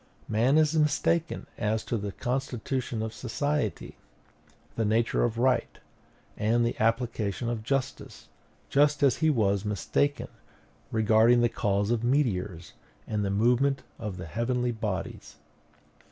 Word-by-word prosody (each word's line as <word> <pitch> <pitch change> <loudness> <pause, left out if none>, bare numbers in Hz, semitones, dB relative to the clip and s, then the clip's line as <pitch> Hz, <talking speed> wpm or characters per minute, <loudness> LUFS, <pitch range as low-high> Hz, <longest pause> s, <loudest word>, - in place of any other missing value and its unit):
Man 120 +7 +3
is 155 0 +3
mistaken 165 +2 +1
as 110 +1 0
to - - -2
the 100 -2 -3
constitution 125 -1 -3
of 110 0 -4
society, 130 0 -2 0.8
the 115 - 0
nature 110 +2 +1
of 115 -1 -1
right, 125 +1 +1 0.6
and 115 +3 +1
the 115 - -1
application 115 -1 0
of 115 -2 -3
justice; 135 +4 -3 0.4
just 145 +1 +3
as 140 - +4
he 160 0 +2
was 100 -8 +1
mistaken 105 +8 -1 0.6
regarding 110 +2 +4
the 120 - +3
cause 100 -2 0
of 120 -1 0
meteors 105 - -1 0.3
and 105 -1 -2
the 100 - -1
movement 125 +7 +2 0.2
of 105 -5 -5
the 90 - -6
heavenly 120 +7 -1
bodies. 110 -4 -5
115 Hz, 130 wpm, -28 LUFS, 110-130 Hz, 0.8 s, as